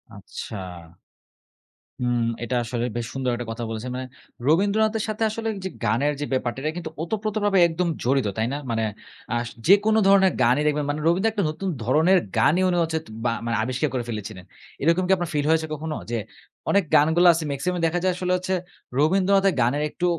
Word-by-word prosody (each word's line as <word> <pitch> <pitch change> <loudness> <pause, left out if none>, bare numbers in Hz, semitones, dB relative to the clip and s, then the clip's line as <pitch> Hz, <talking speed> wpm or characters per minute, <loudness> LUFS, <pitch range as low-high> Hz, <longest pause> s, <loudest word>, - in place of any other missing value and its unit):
আচ্ছা। 100 +1 -8 1.4
হুম, 120 -1 0 0.2
এটা 125 +1 -2
আসলে 120 0 -2
বেশ 120 -1 -2
সুন্দর 130 -2 -1
একটা 120 -1 -6
কথা 115 +1 -5
বলেছেন 115 +3 -5
মানে, 130 0 -4 0.4
রবীন্দ্রনাথের 210 +6 +2
সাথে 215 +1 -2
আসলে 225 +1 -3
যে 190 - -2
গানের 145 +5 +1
যে - - 0
ব্যাপারটা 125 0 -1
এটা 155 +2 -1
কিন্তু 165 -2 -5
ওতপ্রোতভাবে 205 +1 0
একদম 170 +2 -1 0.2
জড়িত 130 -2 +2
তাই 110 +1 +1
না? - - -2
মানে 115 -1 0 0.5
আশ 120 0 -1 0.2
যেকোন 205 +3 +5
ধরনের 190 -2 +6
গানই 125 +5 +4
দেখবেন 150 -1 0
মানে, 150 +1 -1
রবীন্দ্র 190 +6 +3
একটা 205 -3 -1
নতুন 190 +5 -4 0.2
ধরনের 160 - +4 0.2
গানই 160 +11 +4
উনি 175 - +1
হচ্ছে 160 0 -1 0.3
বা 115 - +3
মানে 115 0 0
আবিষ্কার 130 +5 -1
করে 125 -2 -1
ফেলেছিলেন। 105 -4 -6 0.4
এরকম 170 +5 +3
কি - - +1
আপনার 175 -2 -3
ফিল 145 -1 0
হয়েছে 160 0 +2
কখনো 155 +1 -4 0.2
যে, 120 - 0 0.5
অনেক 200 -1 +4
গানগুলো 160 +4 +5
আছে 165 -1 -2
মেক্সিমামই 175 +6 -2
দেখা 175 +2 -1
যায় 185 -1 +2
আসলে 180 0 -2
হচ্ছে 185 +1 -3 0.5
রবীন্দ্রনাথের 195 +4 +3
গানের 140 +6 +1
একটু 180 - -3
160 Hz, 180 wpm, -24 LUFS, 125-190 Hz, 1.4 s, ধরনের